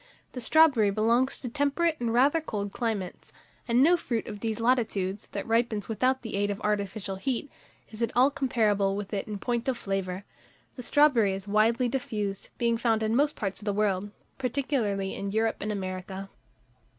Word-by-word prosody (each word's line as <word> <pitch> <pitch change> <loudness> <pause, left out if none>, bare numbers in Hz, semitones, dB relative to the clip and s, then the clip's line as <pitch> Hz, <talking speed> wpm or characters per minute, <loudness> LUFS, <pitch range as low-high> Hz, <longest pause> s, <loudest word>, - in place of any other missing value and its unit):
The 250 - -6
strawberry 270 -6 +5
belongs 230 +6 +1
to 255 - -4
temperate 290 +5 0
and 235 -1 -1
rather 275 +7 +4
cold 205 -9 -4
climates; 215 -6 -3 0.4
and 240 +2 +4
no 340 +4 +6
fruit 235 -9 -2
of 210 -3 -7
these 225 +1 -2
latitudes, 215 -5 0
that 200 - -5
ripens 225 -2 0
without 255 +4 0
the 225 - -4
aid 205 0 +1
of 200 0 -3
artificial 200 -1 -2
heat, 260 +5 -2 0.4
is 220 +1 -9
at 230 - +1
all 260 +3 +5
comparable 210 -8 +1
with 205 +1 -5
it 200 - -2
in 210 -1 -4
point 240 +4 -2
of 260 -2 0
flavour. 195 -2 -3 0.5
The 250 - -7
strawberry 250 -7 +4
is 195 +1 -6
widely 225 +4 +3
diffused, 210 -6 -3
being 235 -1 +1
found 225 -2 +1
in 220 +1 +1
most 290 +3 +2
parts 195 -1 -3
of - - -10
the 205 - 0
world, 205 -1 0 0.3
particularly 245 -7 -1
in 200 - -4
Europe 220 +1 +1
and 210 - -2
America. 190 0 -5
220 Hz, 180 wpm, -28 LUFS, 200-250 Hz, 0.5 s, no